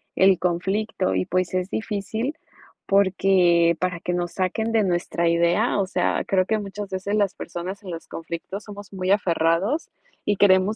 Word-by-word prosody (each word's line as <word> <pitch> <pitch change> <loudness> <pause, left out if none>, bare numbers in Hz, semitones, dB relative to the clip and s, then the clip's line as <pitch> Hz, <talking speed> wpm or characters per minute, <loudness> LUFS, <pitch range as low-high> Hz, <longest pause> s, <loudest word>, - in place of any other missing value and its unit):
el 190 -1 +5
conflicto, 180 - -1
y 95 - 0
pues, 185 0 -1
es 185 +1 -1
difícil 220 +6 -3 0.5
porque 185 -4 +4
para 180 -2 -1
que 180 - -2
nos 175 -1 -2
saquen 220 +4 -1
de 220 -2 +4
nuestra 175 -2 0
idea, 170 +6 +2
o 195 - +2
sea, - - 0
creo 185 -1 +2
que 220 +1 +1
muchas 205 0 -6
veces 195 +2 -2
las 200 -2 +1
personas 185 +4 -6
en 185 - -7
los 165 - -7
conflictos 170 +5 -6
somos 205 -2 -10
muy 185 0 -1
aferrados, 185 - +1 0.4
y 205 - +2
queremos 195 +2 +4
190 Hz, 165 wpm, -24 LUFS, 175-205 Hz, 0.5 s, el